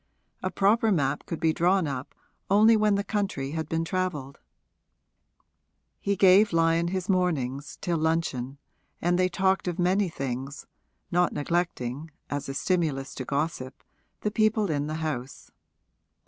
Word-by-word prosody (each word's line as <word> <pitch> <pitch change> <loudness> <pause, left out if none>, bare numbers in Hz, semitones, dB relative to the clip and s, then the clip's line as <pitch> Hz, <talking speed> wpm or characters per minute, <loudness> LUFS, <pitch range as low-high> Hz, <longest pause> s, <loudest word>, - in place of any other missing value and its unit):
A 185 - -1
proper 215 +4 +3
map 140 -6 0
could 165 - -4
be 160 -2 +2
drawn 180 +2 +2
up 135 -3 -5 0.3
only 215 +3 +6
when 210 -1 +3
the 200 - 0
country 200 -11 -2
had 160 -1 -4
been 165 0 -1
travelled. 165 -7 -3 1.6
He 200 - 0
gave 195 +3 +6
Lyon 165 +1 +3
his 185 +1 -3
mornings, 150 - -1
till 170 -3 -1
luncheon, 155 -5 -1 0.4
and 175 +1 +1
they 185 0 +3
talked 190 +1 +1
of 175 -1 -2
many 185 +2 +2
things, 135 -1 -5 0.5
not 175 0 +2
neglecting, 150 -3 -2 0.2
as 145 -1 -3
a 135 - -4
stimulus 155 -7 -1
to 130 - -6
gossip, 140 -2 -3 0.4
the 210 - -1
people 215 -3 +2
in 145 -1 -1
the 155 - -3
house. 135 -3 -5
165 Hz, 145 wpm, -27 LUFS, 140-190 Hz, 1.6 s, only